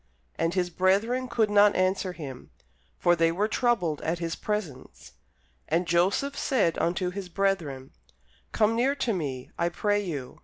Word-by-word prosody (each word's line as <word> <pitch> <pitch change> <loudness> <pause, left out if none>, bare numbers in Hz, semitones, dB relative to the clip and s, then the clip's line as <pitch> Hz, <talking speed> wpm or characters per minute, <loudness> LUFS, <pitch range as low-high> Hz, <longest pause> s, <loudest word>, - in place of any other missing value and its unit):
And 165 +2 -1
his 180 -1 0
brethren 205 +9 +1
could 225 -3 +1
not 205 0 +5
answer 185 0 0
him; 140 -7 -9 0.5
for 175 0 +3
they 165 0 +3
were 200 +5 0
troubled 215 - 0
at 165 +2 -1
his 165 -1 -3
presence. 190 -12 -5 0.6
And 170 +3 +1
Joseph 185 +12 +1
said 215 -14 +1
unto 180 +1 0
his 190 -1 -6
brethren, 170 -9 -1 0.6
Come 215 +1 +2
near 260 +4 +2
to 260 -5 -1
me, 135 -8 -4
I 170 0 +2
pray 205 +3 0
you. 145 -9 -6
185 Hz, 155 wpm, -27 LUFS, 165-210 Hz, 0.6 s, not